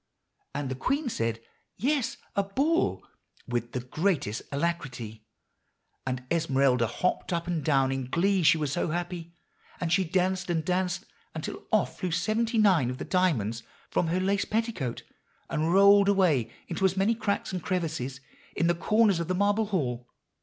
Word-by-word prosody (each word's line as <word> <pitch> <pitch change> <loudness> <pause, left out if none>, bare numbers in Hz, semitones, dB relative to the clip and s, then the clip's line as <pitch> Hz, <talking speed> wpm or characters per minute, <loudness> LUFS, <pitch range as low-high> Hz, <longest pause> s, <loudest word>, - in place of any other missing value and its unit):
"And 140 -2 -2
the - - -1
queen 260 - -1
said, 115 - -2 0.4
'Yes, 260 +2 0 0.2
a 200 - +3
Ball,' 280 - 0 0.4
with 120 -1 -2
the 125 - -2
greatest 140 - -1
alacrity. 135 -9 -3 0.8
And 130 0 -2
Esmeralda 135 -7 +2
hopped 180 +13 -1
up 170 -1 -1
and 170 -4 -2
down 135 -3 +3
in 135 -1 -3
glee, 190 +5 +2
she 165 0 +5
was 150 -3 -1
so 175 - 0
happy; 175 0 -4 0.4
and 170 -1 0
she 190 - +4
danced 185 +1 0
and 165 -2 0
danced 180 0 0 0.3
until - - -6
off - - +1
flew 185 - -1
seventy 220 +7 0
nine 185 - +4
of 125 - -4
the - - -5
diamonds 120 - +1 0.3
from 170 - +1
her 175 +3 +1
lace 200 +2 +1
petticoat, 215 - -2 0.5
and 155 +2 0
rolled 200 +1 +6
away 160 - +3 0.2
into 175 +2 -3
as 190 0 +3
many 200 +4 +3
cracks 200 -4 -2
and 180 - -2
crevices 155 -8 -2 0.3
in - - +1
the 170 - +4
corners 200 +2 +3
of 170 - -2
the 185 - 0
marble 205 +3 +2
hall. 125 - -2
170 Hz, 165 wpm, -28 LUFS, 135-195 Hz, 0.8 s, rolled